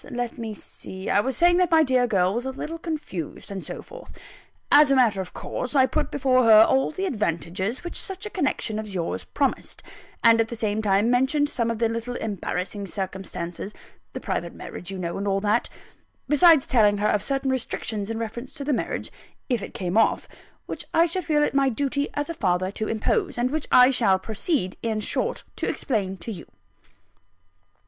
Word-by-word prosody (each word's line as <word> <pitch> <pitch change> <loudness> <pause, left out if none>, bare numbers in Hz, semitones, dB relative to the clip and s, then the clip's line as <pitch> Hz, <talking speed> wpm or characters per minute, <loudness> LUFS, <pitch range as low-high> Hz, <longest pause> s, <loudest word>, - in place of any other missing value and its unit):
Let 245 -1 -4
me 220 -2 -5
see: 190 -1 -7
I - - +4
was 255 +3 -1
saying 350 0 +5
that 360 -2 +3
my 320 -1 +5
dear 255 -3 +2
girl 190 -4 +2
was 240 +3 -2
a - - -1
little 310 +5 -6
confused, 300 - -5
and 195 -2 -5
so - - -7
forth. - - -12 0.6
As 290 0 +7
a 275 - +4
matter 225 -7 +3
of 185 - -8
course, 250 +3 -5
I 265 -2 +6
put 305 +3 -1
before 255 -2 +2
her 220 -1 +9
all 265 +3 +2
the 380 +4 -3
advantages 190 - -2
which 345 - -2
such 385 0 -5
a 425 - -5
connection 265 - -1
as 210 -3 -6
yours 170 -2 -3
promised - - -2 0.4
and 230 0 +6
at 225 - 0
the 235 - -6
same 215 -1 -1
time, 205 +2 +2
mentioned 265 +4 +2
some 235 -4 -1
of 230 - -2
the 230 +1 +2
little 230 +2 -4
embarrassing 200 -1 -4
circumstances 190 0 -5 0.4
the - - -4
private - - -3
marriage, 180 - -8
you 195 - -5
know, 170 -2 -3
and 200 - -3
all 195 0 +1
that 210 +3 +1 0.6
besides 310 -1 +6
telling 210 -5 +3
her 210 +1 +1
of 210 - +2
certain 270 +3 -1
restrictions 220 -4 -2
in 225 - -3
reference 230 +4 -6
to 290 - -6
the 290 +1 0
marriage, - - -3 0.4
if 245 -4 +1
it - - -8
came 180 -1 -3
off, 225 - +2 0.4
which - - -5
I 330 - +6
should 350 +1 -3
feel 300 -3 +2
it - - 0
my 275 -1 +3
duty 280 +3 -1
as 290 0 -1
a 335 - -3
father 185 - 0
to 215 +1 -3
impose; 360 - 0
and 245 +2 0
which 310 0 -2
I 250 +1 +7
shall 205 -7 +4
proceed, 220 - -2
in 220 -2 -1
short, 210 - -1
to - - -1
explain 200 -8 -2
to 230 - -4
you. 180 -6 -8
230 Hz, 200 wpm, -24 LUFS, 200-280 Hz, 0.6 s, her